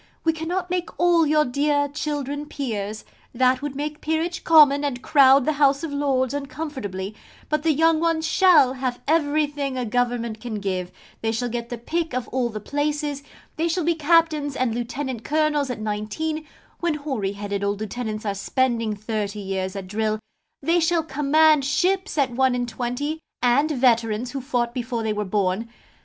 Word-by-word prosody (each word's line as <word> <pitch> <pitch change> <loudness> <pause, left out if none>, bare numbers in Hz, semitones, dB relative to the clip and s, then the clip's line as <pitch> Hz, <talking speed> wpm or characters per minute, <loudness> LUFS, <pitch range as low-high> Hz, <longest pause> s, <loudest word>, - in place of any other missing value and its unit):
We 325 - +3
cannot 350 +3 -3
make 360 -1 -1
all 340 -2 +4
your 305 0 +3
dear 285 +3 +1
children 290 0 -4
Peers 215 -7 -4 0.3
that 255 +1 +3
would 290 -1 -4
make 300 +2 -4
Peerage 320 +2 -1
common 295 -3 +6
and 265 -4 -3
crowd 270 -2 +6
the 310 - +2
House 280 +1 +4
of 315 -3 -4
Lords 270 -2 0
uncomfortably 265 -9 -5 0.4
but 305 -1 +1
the 320 +1 +2
young 320 +2 +3
ones 325 -1 +1
shall 315 -7 +5
have 255 -2 -3
everything 290 -3 +1
a 250 - -1
Government 235 -1 -1
can 240 -3 -5
give: 185 -3 -3 0.3
they 225 - 0
shall 240 +2 -2
get 235 0 -4
the 240 - -4
pick 320 +4 -2
of 255 -1 -2
all 250 -1 0
the 215 -2 -5
places: 290 +3 -2 0.4
they 325 +2 +1
shall 340 +1 0
be 340 +2 +2
Captains 315 -2 +2
and 255 -4 0
Lieutenant 245 0 -4
Colonels 300 -2 +1
at 245 -3 -4
nineteen, 215 +10 -3 0.3
when 340 -3 0
hoary 265 -10 -3
headed 200 0 -4
old 200 0 -1
lieutenants 215 0 -4
are 200 - 0
spending 230 +1 0
thirty 210 -1 -3
years 190 -1 -3
at 195 -1 -5
drill: 215 +2 -1 0.5
they 335 +4 +3
shall 330 0 +2
command 300 +1 +3
ships 370 +7 0
at 275 -3 +2
one 260 +1 +2
and 245 0 -1
twenty, 250 +6 -3 0.2
and 260 +5 +3
veterans 240 -4 +1
who 275 - -4
fought 245 -3 -1
before 240 -2 -3
they 220 -1 0
were 210 0 -2
born. 200 +2 -1
270 Hz, 175 wpm, -23 LUFS, 230-305 Hz, 0.5 s, common